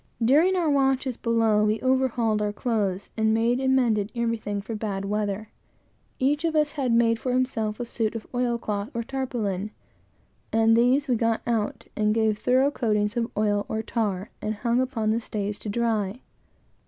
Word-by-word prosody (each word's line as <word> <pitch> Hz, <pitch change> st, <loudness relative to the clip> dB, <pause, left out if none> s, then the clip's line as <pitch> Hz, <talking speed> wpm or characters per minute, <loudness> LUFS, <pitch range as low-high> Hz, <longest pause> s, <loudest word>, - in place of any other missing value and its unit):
During 315 Hz, +10 st, +4 dB
our 350 Hz, -3 st, +1 dB
watches 270 Hz, -3 st, +1 dB
below 225 Hz, -3 st, +2 dB
we 215 Hz, +1 st, +1 dB
overhauled 250 Hz, -4 st, +1 dB
our 210 Hz, 0 st, 0 dB
clothes, 205 Hz, -4 st, -2 dB
and 220 Hz, 0 st, +2 dB
made 235 Hz, +2 st, +2 dB
and 265 Hz, 0 st, +2 dB
mended 220 Hz, -5 st, +1 dB
everything 230 Hz, -3 st, -1 dB
for 210 Hz, +3 st, -6 dB
bad 205 Hz, -3 st, -3 dB
weather. 210 Hz, +1 st, -2 dB, 0.7 s
Each 290 Hz, +4 st, +1 dB
of 325 Hz, -1 st, 0 dB
us 300 Hz, -1 st, +2 dB
had 270 Hz, -5 st, -1 dB
made 230 Hz, -1 st, +3 dB
for 255 Hz, -, -2 dB
himself 225 Hz, -4 st, -1 dB
a 245 Hz, -, -2 dB
suit 225 Hz, -1 st, -2 dB
of 225 Hz, -, -5 dB
oil 245 Hz, -1 st, 0 dB
cloth 210 Hz, -1 st, -3 dB
or 235 Hz, -, -1 dB
tarpaulin, 225 Hz, -7 st, -3 dB, 0.8 s
and 225 Hz, 0 st, +4 dB
these 255 Hz, +5 st, +3 dB
we 250 Hz, -, +2 dB
got 230 Hz, 0 st, 0 dB
out, 225 Hz, -3 st, -1 dB
and 215 Hz, 0 st, +1 dB
gave 220 Hz, -2 st, +1 dB
thorough 260 Hz, +3 st, +3 dB
coatings 210 Hz, -4 st, 0 dB
of 235 Hz, 0 st, -1 dB
oil 205 Hz, -1 st, +1 dB
or 220 Hz, 0 st, -2 dB
tar, 210 Hz, -4 st, -2 dB
and 215 Hz, +1 st, -2 dB
hung 235 Hz, +3 st, +1 dB
upon 230 Hz, -4 st, -1 dB
the 225 Hz, -, +1 dB
stays 205 Hz, -2 st, -4 dB
to 215 Hz, -, -6 dB
dry. 220 Hz, 0 st, -1 dB
230 Hz, 180 wpm, -25 LUFS, 210-250 Hz, 0.8 s, During